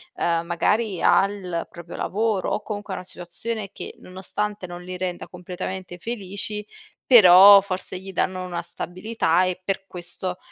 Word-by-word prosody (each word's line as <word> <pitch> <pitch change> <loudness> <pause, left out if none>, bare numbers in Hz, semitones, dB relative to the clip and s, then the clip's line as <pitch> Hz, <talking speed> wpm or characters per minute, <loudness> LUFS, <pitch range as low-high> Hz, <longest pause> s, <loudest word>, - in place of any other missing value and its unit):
uhm, 170 -1 0
magari 195 +3 0
al 195 -4 +2
proprio 170 0 -10
lavoro 210 -1 -1
o - - -1
comunque 205 -2 -5
a - - -3
una 180 - -8
situazione 195 +4 -5
che, - - -8
nonostante 195 +2 -4
non 175 0 -8
li 180 0 -6
renda 180 -1 -4
completamente 180 0 -7
felici, 210 0 -5 0.4
però 200 -3 +9
forse 185 -1 -5
gli 195 +1 -9
danno 185 +1 -1
una 180 -1 -4
stabilità 180 -2 0
e 185 0 -2
per 195 0 -2
questo 180 +1 -6
185 Hz, 150 wpm, -23 LUFS, 180-205 Hz, 0.4 s, però